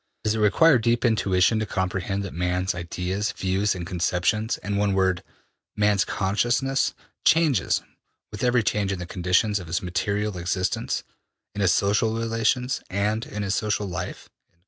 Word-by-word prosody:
Does 110 Hz, -, +1 dB
it 110 Hz, -, -2 dB
require 125 Hz, +7 st, +5 dB
deep 120 Hz, +2 st, +1 dB
intuition 105 Hz, -2 st, +3 dB
to 110 Hz, -, -2 dB
comprehend 95 Hz, +1 st, -2 dB
that 100 Hz, -, -6 dB
man's 90 Hz, +2 st, -1 dB
ideas, 90 Hz, +4 st, -3 dB
views 95 Hz, +2 st, 0 dB
and 90 Hz, -1 st, -5 dB
conceptions, 90 Hz, +5 st, 0 dB
in 105 Hz, 0 st, -2 dB
one 100 Hz, 0 st, +1 dB
word, 95 Hz, -1 st, +2 dB, 0.5 s
man's 105 Hz, -1 st, +2 dB
consciousness, 120 Hz, +8 st, 0 dB, 0.3 s
changes 155 Hz, -, +3 dB, 0.5 s
with 105 Hz, -, -6 dB
every 125 Hz, -2 st, +3 dB
change 100 Hz, -2 st, 0 dB
in 100 Hz, -, -2 dB
the 90 Hz, -, -5 dB
conditions 95 Hz, +3 st, +1 dB
of 90 Hz, -, -9 dB
his 85 Hz, +3 st, -2 dB
material 95 Hz, +3 st, -1 dB
existence, 90 Hz, +1 st, -1 dB, 0.5 s
in 105 Hz, -, -4 dB
his 95 Hz, -2 st, +4 dB
social 105 Hz, +4 st, +2 dB
relations, 115 Hz, +3 st, 0 dB
and 105 Hz, +4 st, -1 dB
in 105 Hz, 0 st, -4 dB
his 100 Hz, -1 st, -1 dB
social 105 Hz, 0 st, 0 dB
life?'' 95 Hz, -, -5 dB
100 Hz, 155 wpm, -25 LUFS, 90-110 Hz, 0.5 s, require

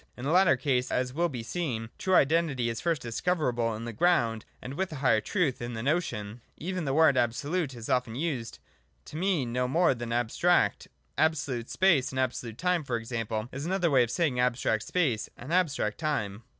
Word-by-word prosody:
In 125 Hz, -, -6 dB
the 145 Hz, -, 0 dB
latter 185 Hz, +1 st, +5 dB
case, 130 Hz, -4 st, 0 dB
as 125 Hz, 0 st, -1 dB
will 170 Hz, +4 st, +1 dB
be 125 Hz, -6 st, -5 dB
seen, 120 Hz, -5 st, -3 dB
true 190 Hz, -1 st, +2 dB
Identity 145 Hz, -5 st, +2 dB
is 115 Hz, -, -5 dB
first 165 Hz, -5 st, 0 dB
discoverable 120 Hz, -3 st, 0 dB
in 115 Hz, +2 st, -6 dB
the 120 Hz, -, -5 dB
Ground, 115 Hz, -6 st, +2 dB
and, 130 Hz, -, -7 dB
with 190 Hz, +4 st, -2 dB
a -, -, -5 dB
higher 130 Hz, -6 st, +2 dB
truth, 150 Hz, -, 0 dB
in 120 Hz, 0 st, -4 dB
the 115 Hz, -, -4 dB
Notion. 120 Hz, -8 st, -2 dB
— -, -, -40 dB
Even 185 Hz, -3 st, -2 dB
the 135 Hz, -, 0 dB
word 160 Hz, -4 st, +5 dB
Absolute 135 Hz, +5 st, 0 dB
is 115 Hz, -1 st, -8 dB
often 125 Hz, -3 st, 0 dB
used 130 Hz, -6 st, -3 dB, 0.5 s
to -, -, -11 dB
mean 160 Hz, -9 st, 0 dB
no 125 Hz, 0 st, +1 dB
more 165 Hz, +4 st, +3 dB
than 120 Hz, -1 st, -6 dB
'abstract.' 120 Hz, +9 st, +2 dB, 0.3 s
Absolute 135 Hz, -7 st, 0 dB
space 175 Hz, -9 st, +3 dB
and 130 Hz, -, -3 dB
absolute 120 Hz, -3 st, -2 dB
time, 180 Hz, 0 st, +1 dB
for 130 Hz, -4 st, -2 dB
example, 115 Hz, -1 st, -3 dB
is 140 Hz, +4 st, -5 dB
another 180 Hz, -3 st, +1 dB
way 130 Hz, -2 st, +5 dB
of 120 Hz, -, +1 dB
saying 145 Hz, -5 st, 0 dB
abstract 125 Hz, -3 st, +1 dB
space 130 Hz, -7 st, 0 dB
and 135 Hz, +7 st, -6 dB
abstract 150 Hz, -, +1 dB
time. 115 Hz, -10 st, -2 dB
130 Hz, 200 wpm, -28 LUFS, 120-165 Hz, 0.5 s, latter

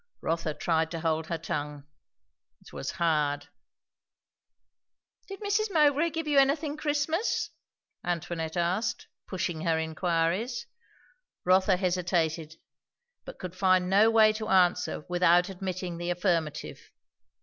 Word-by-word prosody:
Rotha 165 Hz, -2 st, -2 dB
tried 160 Hz, -1 st, 0 dB
to 165 Hz, -1 st, -5 dB
hold 160 Hz, -1 st, 0 dB
her 170 Hz, -, -2 dB
tongue. 150 Hz, -2 st, -4 dB, 0.8 s
It -, -, -17 dB
was -, -, -4 dB
hard. 150 Hz, -4 st, 0 dB, 1.8 s
"Did 390 Hz, 0 st, -9 dB
Mrs. 415 Hz, +1 st, 0 dB
Mowbray 300 Hz, -1 st, +3 dB
give 325 Hz, 0 st, -4 dB
you 290 Hz, -2 st, +4 dB
anything 285 Hz, +2 st, +2 dB
Christmas?" 305 Hz, +6 st, -1 dB, 0.5 s
Antoinette 170 Hz, -1 st, -3 dB
asked, 185 Hz, +7 st, -1 dB, 0.2 s
pushing 175 Hz, -4 st, -3 dB
her 165 Hz, -1 st, +1 dB
inquiries. 170 Hz, +8 st, -1 dB, 0.8 s
Rotha 185 Hz, +1 st, +4 dB
hesitated, 175 Hz, -4 st, -1 dB, 0.7 s
but -, -, -9 dB
could 185 Hz, -1 st, -7 dB
find 185 Hz, -1 st, +2 dB
no 210 Hz, +3 st, +6 dB
way 220 Hz, -1 st, +5 dB
to 215 Hz, 0 st, -5 dB
answer 180 Hz, -4 st, +2 dB
without 175 Hz, +1 st, +3 dB
admitting 185 Hz, -2 st, -5 dB
the 175 Hz, 0 st, -3 dB
affirmative. 170 Hz, -4 st, -1 dB
180 Hz, 115 wpm, -28 LUFS, 165-220 Hz, 1.8 s, no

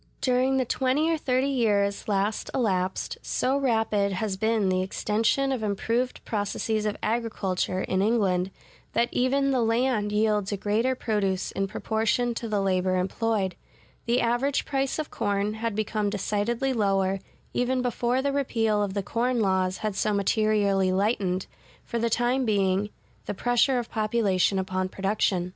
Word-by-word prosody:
During 255 Hz, +1 st, +2 dB
the 260 Hz, -, +1 dB
twenty 265 Hz, +7 st, +1 dB
or 325 Hz, -, +1 dB
thirty 255 Hz, -2 st, +1 dB
years 205 Hz, -6 st, +1 dB
last 205 Hz, +1 st, 0 dB
elapsed, 190 Hz, -6 st, -1 dB
so 260 Hz, +2 st, 0 dB
rapid 220 Hz, -7 st, +1 dB
has 195 Hz, +1 st, -2 dB
been 220 Hz, 0 st, +1 dB
the 185 Hz, 0 st, +1 dB
extension 220 Hz, +8 st, 0 dB
of 260 Hz, -4 st, -1 dB
improved 230 Hz, +4 st, -1 dB
processes 215 Hz, 0 st, -1 dB
of 210 Hz, -, -2 dB
agriculture 215 Hz, -5 st, -1 dB
[in 190 Hz, -, 0 dB
England], 195 Hz, -4 st, +2 dB, 0.4 s
that 235 Hz, +1 st, +2 dB
even 275 Hz, +2 st, +2 dB
the 255 Hz, -2 st, +2 dB
land 230 Hz, -2 st, +1 dB
yields 210 Hz, -1 st, +1 dB
a 205 Hz, -, -1 dB
greater 220 Hz, +6 st, +1 dB
produce 200 Hz, -6 st, -1 dB
in 195 Hz, 0 st, -1 dB
proportion 220 Hz, +3 st, 0 dB
to 230 Hz, 0 st, -5 dB
the 205 Hz, -2 st, +1 dB
labor 185 Hz, -1 st, +1 dB
employed; 195 Hz, +1 st, 0 dB, 0.5 s
the 240 Hz, +2 st, +2 dB
average 240 Hz, +4 st, +1 dB
price 270 Hz, -1 st, -1 dB
of 310 Hz, -1 st, -4 dB
corn 205 Hz, -1 st, -1 dB
had 225 Hz, -1 st, -3 dB
become 215 Hz, -1 st, -1 dB
decidedly 215 Hz, +6 st, -1 dB
lower, 195 Hz, -3 st, +1 dB, 0.3 s
even 255 Hz, +1 st, 0 dB
before 245 Hz, +1 st, 0 dB
the 280 Hz, 0 st, 0 dB
repeal 225 Hz, -6 st, +1 dB
of 200 Hz, -1 st, -2 dB
the 200 Hz, -, -1 dB
corn 240 Hz, +4 st, 0 dB
laws 190 Hz, -2 st, +1 dB
had 210 Hz, -2 st, -1 dB
so 210 Hz, +1 st, 0 dB
materially 200 Hz, -2 st, +2 dB
lightened, 190 Hz, -2 st, 0 dB, 0.4 s
for 235 Hz, -, -3 dB
the 235 Hz, 0 st, +1 dB
time 245 Hz, +3 st, +1 dB
being, 200 Hz, -2 st, +1 dB, 0.4 s
the 205 Hz, -, -3 dB
pressure 245 Hz, +4 st, +2 dB
of 240 Hz, -1 st, -4 dB
population 215 Hz, -4 st, +1 dB
upon 185 Hz, 0 st, -1 dB
production. 195 Hz, -2 st, 0 dB
215 Hz, 155 wpm, -26 LUFS, 195-240 Hz, 0.5 s, During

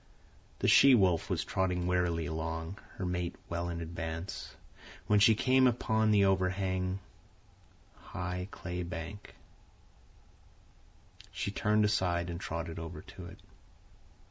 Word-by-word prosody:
The -, -, 0 dB
she 135 Hz, -2 st, +8 dB
wolf 95 Hz, -6 st, +2 dB
was -, -, -1 dB
trotting 90 Hz, -2 st, 0 dB
wearily 90 Hz, -2 st, +1 dB
along, 80 Hz, +4 st, -4 dB, 0.2 s
her 95 Hz, -, -3 dB
mate 90 Hz, -1 st, -2 dB
well 85 Hz, +1 st, -2 dB
in 85 Hz, -1 st, -4 dB
advance, 80 Hz, +2 st, -5 dB, 0.5 s
when 105 Hz, -1 st, +4 dB
she 110 Hz, +2 st, +6 dB
came 130 Hz, +3 st, +4 dB
upon 110 Hz, -2 st, +1 dB
the 100 Hz, -2 st, +5 dB
overhanging, 95 Hz, -1 st, 0 dB, 1.0 s
high 90 Hz, +1 st, -5 dB
clay 90 Hz, -2 st, -5 dB
bank. 90 Hz, +3 st, -7 dB, 2.0 s
She 100 Hz, -, -3 dB
turned 105 Hz, +1 st, +2 dB
aside 90 Hz, -4 st, +1 dB
and 85 Hz, -, -5 dB
trotted 80 Hz, -1 st, -4 dB
over 80 Hz, -1 st, -7 dB
to -, -, -11 dB
it. -, -, -11 dB
90 Hz, 120 wpm, -31 LUFS, 85-100 Hz, 2.0 s, she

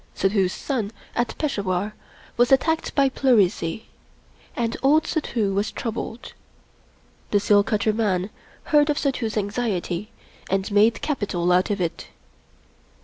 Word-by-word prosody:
Suddhoo's 195 Hz, -1 st, +1 dB
son 225 Hz, -5 st, -3 dB, 0.2 s
at 240 Hz, -1 st, -1 dB
Peshawar 200 Hz, -, -1 dB, 0.4 s
was 245 Hz, +2 st, +3 dB
attacked 320 Hz, +4 st, +2 dB
by 275 Hz, -1 st, +4 dB
pleurisy, 220 Hz, -8 st, +1 dB, 0.7 s
and 230 Hz, -1 st, -1 dB
old 295 Hz, +4 st, +4 dB
Suddhoo 225 Hz, -, -1 dB
was 200 Hz, +2 st, 0 dB
troubled. 230 Hz, -1 st, -5 dB, 1.0 s
The 205 Hz, -, +3 dB
seal 205 Hz, 0 st, +4 dB
cutter 215 Hz, 0 st, 0 dB
man 205 Hz, -3 st, 0 dB, 0.3 s
heard 295 Hz, 0 st, +3 dB
of 295 Hz, -, +1 dB
Suddhoo's 245 Hz, -6 st, -1 dB
anxiety 205 Hz, -2 st, -2 dB, 0.4 s
and 195 Hz, +2 st, -1 dB
made 210 Hz, +1 st, +3 dB
capital 200 Hz, -, -1 dB
out 180 Hz, +1 st, +3 dB
of 205 Hz, -1 st, -1 dB
it. 170 Hz, -2 st, -3 dB
215 Hz, 125 wpm, -23 LUFS, 195-245 Hz, 1.0 s, by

